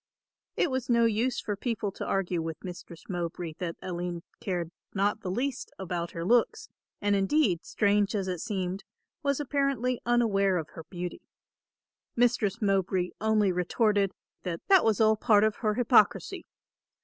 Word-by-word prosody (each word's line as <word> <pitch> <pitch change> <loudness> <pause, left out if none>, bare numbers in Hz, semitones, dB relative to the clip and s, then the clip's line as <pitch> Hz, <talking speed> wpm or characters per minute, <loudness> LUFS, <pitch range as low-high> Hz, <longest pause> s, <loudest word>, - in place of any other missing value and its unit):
It 335 - +2
was 260 -1 -2
no 235 -1 +4
use 230 +3 +1
for 205 - -3
people 215 -1 -2
to - - -6
argue 180 -3 0
with 160 -1 -6
Mistress 175 -2 -9
Mowbray 175 -2 -4
that 170 -2 -3
Aline 175 -1 -4 0.2
cared 180 -7 -3 0.2
not 205 +2 +1
the 185 - -4
least 255 +7 -2
about 175 -2 -3
her 165 0 -4
looks, 235 +4 +2 0.3
and 205 0 +3
indeed, 195 - +2
strange 205 0 +1
as 195 -2 -1
it 180 -2 -2
seemed, 190 -1 -3 0.4
was 280 -2 0
apparently 275 -3 0
unaware 205 -6 +2
of 160 -3 -4
her 165 - -10
beauty. 175 +1 -6 0.9
Mistress 235 -3 +2
Mowbray 190 -2 +1
only 215 -3 +3
retorted 200 +3 +1 0.3
that 170 -3 -4
that 385 -3 +7
was 220 -3 +2
all 220 -1 +5
part 210 -1 +4
of 215 -1 +1
her 215 -2 0
hypocrisy. 235 -3 +3
200 Hz, 155 wpm, -28 LUFS, 180-230 Hz, 0.9 s, that